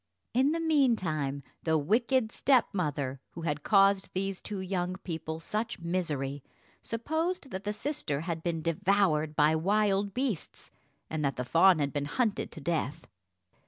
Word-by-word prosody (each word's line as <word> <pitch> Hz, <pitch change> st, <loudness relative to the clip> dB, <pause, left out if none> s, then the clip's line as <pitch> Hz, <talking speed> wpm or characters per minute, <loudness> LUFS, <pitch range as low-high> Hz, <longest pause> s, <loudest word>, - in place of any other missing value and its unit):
In 260 Hz, +4 st, +3 dB
the 330 Hz, -, 0 dB
meantime 185 Hz, -, +1 dB, 0.2 s
the 160 Hz, -1 st, +2 dB
wicked 225 Hz, -, +2 dB
stepmother, 150 Hz, -, +1 dB
who 170 Hz, -, -7 dB
had 150 Hz, -3 st, -1 dB
caused 195 Hz, +1 st, +4 dB
these 195 Hz, 0 st, -2 dB
two 205 Hz, -2 st, -5 dB
young 185 Hz, -1 st, -2 dB
people 160 Hz, -4 st, -5 dB
such 215 Hz, +7 st, -3 dB
misery, 155 Hz, -6 st, -2 dB, 0.4 s
supposed 315 Hz, +6 st, -2 dB
that 190 Hz, +1 st, -5 dB
the 205 Hz, -, 0 dB
sister 210 Hz, -, -2 dB
had 165 Hz, -1 st, -3 dB
been 165 Hz, -2 st, -2 dB
devoured 170 Hz, -3 st, +2 dB
by 150 Hz, +1 st, +4 dB
wild 200 Hz, +3 st, +1 dB
beasts, 250 Hz, -, -3 dB, 0.4 s
and 155 Hz, -1 st, -3 dB
that 135 Hz, -3 st, 0 dB
the 125 Hz, -, -3 dB
fawn 170 Hz, +8 st, +6 dB
had 140 Hz, -2 st, -1 dB
been 145 Hz, -1 st, -1 dB
hunted 220 Hz, -, -1 dB
to -, -, -8 dB
death. 150 Hz, -2 st, -2 dB
180 Hz, 150 wpm, -30 LUFS, 155-215 Hz, 0.4 s, fawn